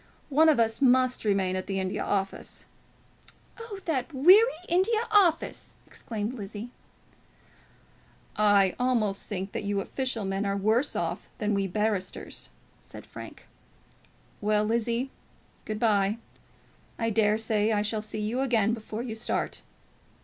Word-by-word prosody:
One 310 +3 +5
of 300 - +3
us 225 +1 +1
must 255 -1 +3
remain 195 -3 +1
at 185 - -4
the 195 -1 -1
India 190 0 -2
Office 195 -1 -3 0.5
" - - -24
"Oh, 460 -3 -7
that 280 -3 -1
weary 370 - +7 0.2
India 435 +6 +2
Office!" 375 -6 +2
exclaimed 220 0 -5
Lizzie. 215 +1 -7 1.6
"I 205 -3 +4
almost 230 -6 0
think 195 -1 -4
you 205 -1 -1
official 245 0 -2
men 195 +1 -1
are 200 0 -1
worse 220 +8 +1
off - - -3
than 210 -2 0
we 195 -1 0
barristers," 205 -1 -3 0.3
said - - -12
Frank. - - -11 1.0
"Well, 210 0 +2
Lizzie, 235 +3 -1 0.5
good 215 -1 -4
bye. 210 -2 +2 0.8
I 230 -1 0
dare 210 0 +3
say 220 -1 +1
I 210 -1 +1
shall 215 +1 -1
see 215 0 -4
you 225 +5 -1
again 230 -5 +2
before 220 0 -5
you 240 -3 -4
start." 220 +2 -3
220 Hz, 135 wpm, -27 LUFS, 205-255 Hz, 1.6 s, weary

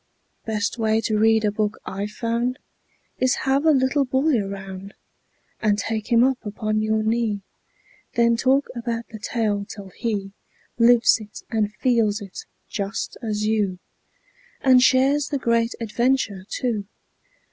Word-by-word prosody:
Best 220 +1 -2
way 220 0 +2
to 215 -2 0
read 220 0 +4
a 210 - +2
book 210 0 -1
I've 200 +2 -4
found 235 +3 -1 0.6
Is 255 0 +3
have 275 +3 +2
a - - +7
little 270 +1 +2
boy 270 +3 +1
around 195 0 -7 0.7
And 210 -2 +2
take 220 +2 -3
him 235 0 +6
up 260 0 +1
upon 215 0 -2
your 215 0 +1
knee; 220 -2 0 0.7
Then 235 0 +4
talk 265 +4 +2
about 235 -1 -3
the 220 - -9
tale, 210 -2 -1
till 200 -1 -9
he 200 -1 -3 0.5
Lives 235 0 +5
it 210 -1 -11
and 215 -2 0
feels 230 -5 +2
it, 195 -3 -9 0.2
just 200 -1 -4
as 215 -2 -2
you, 210 -4 0 0.8
And 255 -2 +6
shares 270 +3 +4
the 285 - -1
great 230 -2 +1
adventure, 230 -4 0
too. 220 -6 -2
225 Hz, 145 wpm, -23 LUFS, 210-245 Hz, 0.8 s, a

